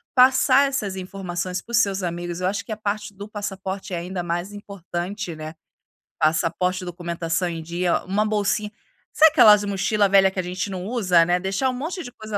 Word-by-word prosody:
passar 260 +2 +5
essas 210 -8 -3
informações 180 -1 -4
para 235 - -14
os - - +4
seus 195 -2 +1
amigos, 175 0 -4
eu 185 - +1
acho 200 +1 -2
que - - -8
a - - -1
parte 210 -1 -3
do 205 +2 -9
passaporte 195 -1 -5
é - - -1
ainda 180 +1 -4
mais 175 +3 -3
importante, 195 -1 -5
né, 155 +1 -7 0.7
passaporte, 170 +3 +1
documentação 170 0 -2
em 165 -1 -5
dia, 170 +2 -1
uma 205 +3 0
bolsinha. 210 0 0 0.4
Sabe, 315 0 +7
aquelas 210 -9 +7
mochila 200 +1 +1
velha 195 -1 +6
que 190 - -5
a - - 0
gente 180 +3 -3
não 185 -1 -5
usa, 185 -8 +3
né, 175 +1 +1
deixar 195 +8 0
um - - -2
monte 330 +8 -4
de 245 - -9
coisa 215 -2 -5
190 Hz, 195 wpm, -23 LUFS, 175-210 Hz, 0.7 s, Sabe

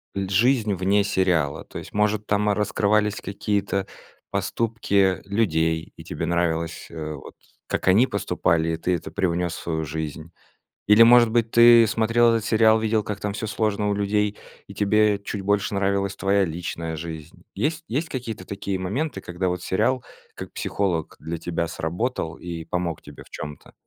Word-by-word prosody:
жизнь 105 +3 +2
вне 95 +2 +2
сериала? 90 -7 0
То - - -10
есть - - -9
может 105 0 +1
там 105 0 +1
раскрывались 105 0 +1
какие-то 100 -1 -1 0.5
поступки 100 -5 0
людей, 80 -6 0
и - - -11
тебе - - -4
нравилось, 85 -1 -1
э, 80 -2 -5
вот 70 - -11 0.3
как - - -3
они 110 +8 +5
поступали 85 -5 0
и 80 - -1
ты 90 +2 0
это 85 - -7
привнёс 90 -3 -1
в - - -7
свою 80 -1 -2
жизнь? 80 +1 -5 0.6
Или 105 +2 +8
может 120 -1 +7
быть 115 -1 +1
ты 115 -1 +8
смотрел 115 +2 +3
этот 115 -2 -1
сериал, 110 -1 +4
видел 110 -1 +1
как 100 -1 -5
там 105 - -2
всё 110 - -4
сложно 105 -1 -1
у 100 - +1
людей 105 +1 0 0.3
и - - -11
тебе 105 0 +3
чуть 100 0 -5
больше 100 0 0
нравилась 100 0 0
твоя 100 0 +2
личная 80 -1 -4
жизнь? 80 0 -8
Есть 155 +2 -1
есть 150 +8 -2
какие-то 115 -9 -5
такие 100 0 -4
моменты, 130 - -2
когда 90 +1 -3
вот 90 0 -3
сериал 120 +6 +1 0.3
как - - -8
психолог 90 -6 -2
для 80 +2 -5
тебя 85 0 -2
сработал 85 0 -3
и 85 -2 -6
помог 85 -1 -3
тебе - - -12
в - - -21
чём-то? 75 -2 -8
100 Hz, 165 wpm, -24 LUFS, 85-110 Hz, 0.6 s, Или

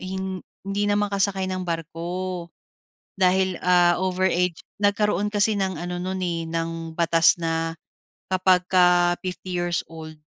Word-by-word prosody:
hin 190 0 -4 0.2
hindi 200 +1 -1
na 205 - +2
makasakay 200 -2 0
ng 185 0 -3
barko. 170 +2 -4 0.7
Dahil, 185 -1 +2
ah, 175 -1 +4
over 185 0 0
age 175 -1 0 0.2
nagkaroon 205 0 +2
kasi 210 +1 +2
ng 190 -2 -1
ano 175 +1 -4
non 185 +1 -3
eh, 165 -2 -2
ng 165 0 -4
batas 165 0 +4
na 165 0 -2 0.6
kapagka 180 -1 +4
50 185 0 -5
years 175 -1 -1
old, 155 -1 -9
180 Hz, 135 wpm, -24 LUFS, 170-190 Hz, 0.7 s, ah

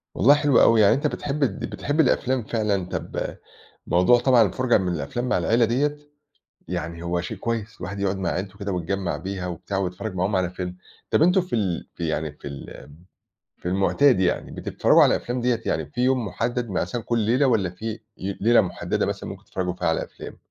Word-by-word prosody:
والله 140 - +6
حلوة 145 -4 +4
أوي، 115 -1 +6
يعني 100 - +6
أنت 150 +2 0
بتحب 145 0 -3
د 105 -8 -1
بتحب 145 +3 -3
الأفلام 130 -4 +2
فعلًا، 105 -4 -1
طَب - - -4 0.5
موضوع 90 +8 +5
طبعًا 125 -1 +5
الفُرجة 120 +5 +3
من 90 -3 -1
الأفلام 85 - -3
مع - - +2
العيلة 115 +7 +3
ديّة 145 +6 0 0.7
يعني 85 +2 -4
هو 85 0 -1
شيء 85 - -5
كويس 115 -2 -3
الواحد 100 +3 -5
يُقعد 100 -1 0
مع 95 -2 -1
عيلته 95 +2 -4
كده 100 -1 -3
ويتجمّع 90 +2 -2
بيها 95 0 -5
وبتاع 90 +3 -4
ويتفرّج 95 +2 -3
معاهم 95 +3 0
على 90 -1 0
فيلم. 90 -1 -5 0.3
طَب - - +3
أنتم 180 +3 +5
في 180 -8 -3
ال 95 -6 -2
في 85 -2 -3
يعني 80 -1 -2
في 75 - -9
الم 70 +1 -10 0.6
في - - -7
المُعتاد 100 +6 +3
يعني 90 -2 0
بتتفرّجوا - - +3
على - - +4
أفلام 125 +1 -3
ديّة، 120 -1 +1
يعني - - -1
في 125 -4 -5
يوم 130 -2 +2
مُحدّد 120 +3 -2
مثلّا 110 +5 -2
كل 115 +1 -1
ليلة 120 +6 +2
والّا 110 -8 +2
في 110 +5 -6 0.2
ي 95 +1 -4
ليلة 115 +2 +5
مُحدّدة 90 -4 -2
مثلًا - - -4
ممكن - - -9
تتفرّجوا 90 -1 -3
فيها 90 - -2
على 80 - +1
أفلام؟ - - -10
100 Hz, 200 wpm, -24 LUFS, 90-120 Hz, 0.7 s, والله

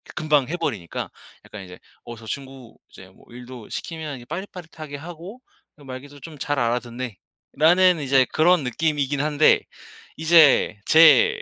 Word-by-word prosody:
금방 150 -4 +1
해 175 - -3
버리니까 110 - -5 0.4
약간 105 -2 -10
이제 90 -1 -13 0.2
"어 120 - -9
저 110 0 -14
친구 135 -2 -9
이제 95 - -15
뭐 95 - -23
일도 125 -2 -11
시키면 155 -4 -6
이게 120 - -13
빠릿빠릿하게 165 -2 -8
하고 175 - -11 0.4
이 - - -16
말귀도 140 +2 -10
좀 155 +1 -11
잘 145 +1 -2
알아듣네."라는 130 - 0
이제 135 -2 +3
그런 170 0 +3
느낌이긴 145 +2 -2
한데 150 0 +3 0.6
이제 160 -9 +4
제 470 - +5
145 Hz, 305 characters per minute, -22 LUFS, 125-160 Hz, 0.6 s, 제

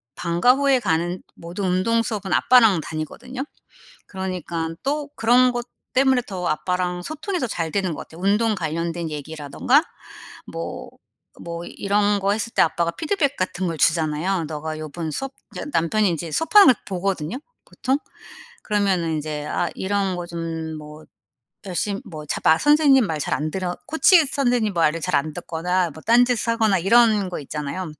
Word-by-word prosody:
방과 175 +8 +3
후에 275 -1 +3
가는 175 -3 -1
모든 175 +4 -5
운동 185 +6 +2
수업은 210 -4 -3
아빠랑 225 -9 +5
다니거든요. 235 - -6 0.6
그러니깐 175 -4 -4
또 290 +1 -2
그런 250 +2 +4
것 240 0 -4 0.3
때문에 265 -1 +4
더 180 -3 -4
아빠랑 180 +2 -1
소통이 315 - -4
더 255 - -1
잘 165 -7 -3
되는 190 -3 -1
것 - - -8
같아요. 165 +2 -13
운동 210 +3 +2
관련된 165 0 -3
얘기라든가 155 - 0 0.7
뭐 - - -6 0.5
뭐 170 0 -6
이런 205 +2 +1
거 200 +1 +1
했을 220 +2 -3
때 - - +3
아빠가 170 +1 +1
피드백 290 - -1
같은 185 0 -2
걸 165 -1 -3
주잖아요. 165 +3 +1
"너가 155 +1 -5
요번 155 +1 -5
수업" 270 - -4 0.2
이제 - - -4
남편이 195 - +2
인제 170 -1 -3
수업하는 400 - +6
걸 255 - +7
보거든요, 190 +1 -2 0.3
보통. 265 +2 -1 0.7
그러면은 190 -6 +1
인제 150 -1 -4
아 - - -1
이런 195 -1 -1
거 175 - -4
좀 165 -2 -5
뭐 150 +1 -12 0.6
열심 200 +4 -2
뭐 155 -7 -8
잘 - - -3
말 160 +1 +5
선생님 295 -4 +5
말 160 -2 -2
잘 - - -1
안 155 +1 -3
들어 180 -1 -3
코치 325 +1 +5
선생님 245 -6 +1
말을 165 -1 +1
잘 - - 0
안 155 +2 0
듣거나 175 +1 -1
뭐 155 - -12
딴짓을 240 0 +3
하거나 220 -5 +2
이런 210 0 +4
거 180 - -5
있잖아요. 150 +4 -5
185 Hz, 330 characters per minute, -22 LUFS, 165-230 Hz, 0.7 s, 걸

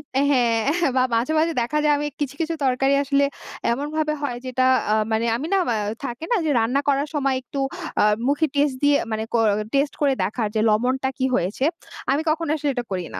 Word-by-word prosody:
অ্যা 270 - +3
হ্যাঁ 255 +6 +2
বা 255 - +4
মাঝে, 240 +7 0
মাঝে 330 +1 +1
দেখা 265 +6 -1
যায় 300 -1 +4
আমি 295 +1 -2
কিছু, 280 -1 -2
কিছু 330 +1 -1
তরকারি 270 +2 +2
আসলে 280 0 +2 0.5
এমনভাবে 305 +3 -2
হয় 245 -4 -2
যেটা 255 0 0 0.3
আ - - +4 0.2
মানে 220 +1 +1
আমি 295 - -4
না - - +4
বা 230 - +1 0.3
থাকে 240 +6 -5
না 470 - +4
যে - - +1
রান্না 250 +5 +1
করার 280 +1 +1
সময় 275 -2 +1
একটু 275 +3 -6 0.4
আ - - +5 0.2
মুখে 290 +3 +2
টেস্ট 285 -2 +2
দিয়ে, 290 0 +5
মানে 220 0 -1
ক - - +2 0.4
টেস্ট 280 +1 +1
করে 280 -2 +3
দেখার 215 +3 -1
যে 215 - +2
লবণটা 255 +5 +1
কি 260 - 0
হয়েছে। 200 +10 -1 0.5
আমি 285 +3 +2
কখনো 325 0 -1
আসলে 290 -1 -1
এটা 245 -2 -3
করি 180 -2 -2
না। - - -4
275 Hz, 210 wpm, -22 LUFS, 240-295 Hz, 0.5 s, আ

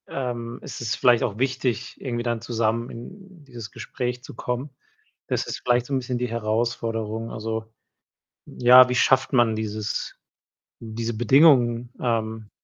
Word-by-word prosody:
Ähm, 120 -2 -4
es - - -8
ist 120 +1 -1
vielleicht 120 -2 +4
auch 105 -3 -2
wichtig, 130 -2 -1
irgendwie 120 -3 -3
dann 120 -2 -2
zusammen 115 0 -1
in 185 - -11
dieses 120 -5 -9
Gespräch 125 +2 -4
zu - - -10
kommen. 125 +4 -3 0.6
Das - - -1
ist - - -5
vielleicht 120 0 +2
so 140 - -5
'n 135 - +2
bisschen 125 0 -3
die 125 0 -1
Herausforderung. 115 0 -2
Also, 110 0 -4 0.8
ja, 125 +1 +7
wie 125 - -1
schafft 130 +1 +3
man 120 -4 +3
dieses 110 -1 -3 0.6
diese 115 +1 -4
Bedingungen, 120 -1 +4
ähm 110 -2 -2
120 Hz, 145 wpm, -24 LUFS, 115-125 Hz, 0.8 s, ja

